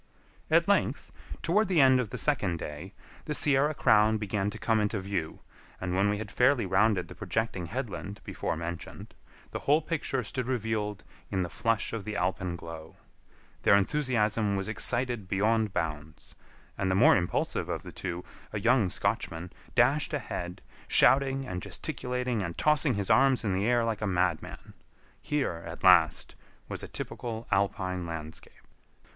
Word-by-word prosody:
At - - +4
length, - - +1 0.3
toward 200 +6 +2
the 180 -4 +2
end 130 -2 +6
of 120 -5 -2
the - - -5
second 105 - 0
day, 80 +5 -7 0.3
the 150 - -1
Sierra 145 +1 +3
Crown 110 -2 +4
began 105 -1 -1
to - - -7
come 115 -1 +1
into 105 0 0
view, 95 -5 -4 0.4
and 90 -1 -3
when 100 +2 +2
we 105 - 0
had 105 0 -6
fairly 125 -2 +3
rounded 95 0 +2
the - - -10
projecting 110 -6 -2
headland 105 -2 -5
before - - -3
mentioned, 85 +1 -7 0.4
the - - -4
whole 145 +2 +3
picture 150 -5 -2
stood 125 +2 -3
revealed 110 -4 -2 0.3
in 95 -2 0
the 85 - -5
flush 115 +4 0
of 115 -3 -3
the 105 0 -5
alpenglow. 85 -4 -4 0.7
Their 100 - +5
enthusiasm 105 -3 +1
was 95 0 -2
excited 120 0 -1
beyond 110 +2 +1
bounds, 80 -2 -4 0.5
and 95 - 0
the 95 - +2
more 110 - +6
impulsive 90 -2 -1
of - - -3
the - - -9
two, 90 -1 -5 0.3
a 105 - -3
young 115 -2 +3
Scotchman, 85 0 -2 0.2
dashed - - +3
ahead, 90 +2 -5 0.2
shouting 135 0 +4
and 90 -6 -4
gesticulating 125 - -2
and 85 -3 -4
tossing 150 -4 +2
his 100 -1 -1
arms 135 -3 +4
in 100 -4 0
the 95 +3 0
air 120 -1 +3
like 110 -2 -2
a 105 - 0
madman. 90 -3 -2 0.5
Here, 135 - -2
at - - -8
last, - - +5 0.3
was - - -4
a - - -6
typical 115 -2 -6
alpine 95 -2 0
landscape. 80 -1 -8
105 Hz, 160 wpm, -29 LUFS, 90-125 Hz, 0.7 s, end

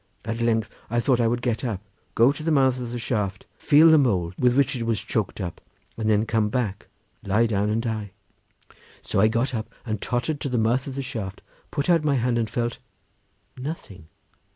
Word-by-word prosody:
At 115 +1 -3
length 115 -2 +2 0.2
I 120 +2 +1
thought 125 0 +2
I 115 - +3
would 120 +1 -1
get 120 -1 -1
up, 115 -7 -2 0.4
go 120 +4 +6
to 145 - -6
the 160 - -1
mouth 130 -4 +3
of 120 -2 -4
the 120 - -3
shaft, 105 -5 -2
feel 155 +2 +6
the 160 - +7
mould 95 -10 +1
with 125 0 +3
which 140 -1 +3
it 120 - -4
was 115 -2 0
choked 110 -2 -2
up, 90 -4 -5 0.3
and 110 -1 -1
then 105 0 +3
come 110 -2 +1
back, 105 -5 -2 0.4
lie 105 +4 +2
down 105 -2 0
and 110 +2 0
die. 110 -3 -3 0.9
So - - -1
I 110 - +6
got 115 +4 0
up 110 -2 -4
and 110 -3 -3
tottered 130 +5 -1
to 140 - -2
the 125 - 0
mouth 120 +4 +1
of 135 - -5
the 135 - -3
shaft, 100 -6 -6 0.3
put 145 - -2
out 170 -3 +4
my 145 -2 +2
hand 120 -1 +1
and 115 -2 -1
felt—nothing. 120 - -7
115 Hz, 205 wpm, -24 LUFS, 110-130 Hz, 0.9 s, the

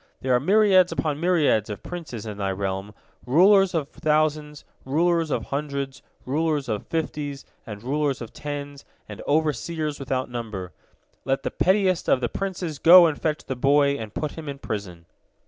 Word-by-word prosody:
There 130 -1 +1
are 125 - +4
myriads 190 - +4
upon 155 -3 -2
myriads 155 - +2
of 105 - -7
princes 155 -11 -7
in 105 -2 -7
thy 100 -1 -1
realm, 95 +1 -4 0.3
rulers 190 +7 +5
of 150 -3 -1
thousands, 150 -2 -1 0.2
rulers 165 +3 +1
of - - -1
hundreds, 140 -1 -4 0.2
rulers 150 0 0
of 110 -3 -3
fifties, 150 -3 -4 0.2
and 105 -1 -8
rulers 140 +1 -1
of 115 -1 -9
tens, 145 -1 -6 0.2
and - - -9
overseers 155 +1 -1
without 130 -1 -2
number. 110 -7 -6 0.5
Let 135 +1 -1
the - - -2
pettiest 185 -2 +1
of - - +4
the 120 -2 -2
princes 180 -6 -4
go 175 +1 +9
and 155 -3 -1
fetch 155 -1 -2
the 130 - -3
boy 140 +3 +3
and 110 -5 -6
put 150 +6 -3
him 155 -3 -8
in 140 - -5
prison." 95 -9 -6
145 Hz, 165 wpm, -24 LUFS, 125-160 Hz, 0.5 s, go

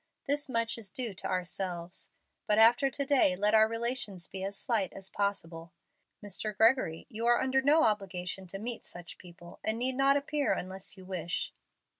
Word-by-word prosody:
This 285 0 0
much 230 -1 -1
is 210 -4 -6
due 235 0 -4
to 190 - -5
ourselves. 180 -1 -3 0.4
But 210 -1 +3
after 235 +5 +6
to 280 +1 -3
day 265 -10 +4
let 205 +3 +1
our 220 0 +6
relations 230 -5 -2
be 190 -1 -7
as 195 +1 -3
slight 210 -6 0
as 195 -1 -9
possible. 170 -4 -3 0.5
Mr. 205 +1 -3
Gregory, 225 -8 +3
you 230 +2 -3
are 240 0 +5
under 265 0 +2
no 300 +4 +5
obligation 190 -3 -1
to 195 - -6
meet 230 +3 -4
such 175 -1 -8
people, 175 -1 -13
and 220 +1 +1
need 255 +2 +1
not 275 +2 +4
appear 285 0 0
unless 190 +2 -6
you 185 - -12
wish." 175 -3 -3
210 Hz, 180 wpm, -31 LUFS, 185-240 Hz, 0.5 s, after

